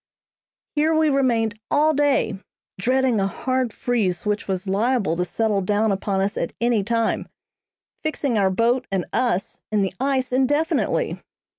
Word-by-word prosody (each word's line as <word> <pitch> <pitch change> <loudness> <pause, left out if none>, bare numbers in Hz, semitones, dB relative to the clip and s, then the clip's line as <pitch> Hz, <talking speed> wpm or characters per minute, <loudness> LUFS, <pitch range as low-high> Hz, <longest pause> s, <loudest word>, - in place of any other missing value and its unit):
Here 315 +1 +2
we 315 -1 +3
remained 230 -6 +1
all 305 +2 +3
day, 280 -8 +1 0.4
dreading 255 +1 +2
a 195 - +1
hard 255 +3 -1
freeze 215 -7 -1
which 210 0 -1
was 190 0 -2
liable 205 -2 +1
to 180 - 0
settle 205 +3 0
down 210 +3 +1
upon 195 0 -1
us 200 +2 -1
at 170 - -2
any 235 -3 +2
time, 230 +1 0 0.7
fixing 290 -5 -1
our 195 -3 +3
boat 235 +6 +1
and 190 -3 0
us 235 -7 0
in 210 -2 +2
the 190 - -2
ice 265 -2 0
indefinitely. 290 +5 +1
230 Hz, 150 wpm, -22 LUFS, 195-260 Hz, 0.7 s, we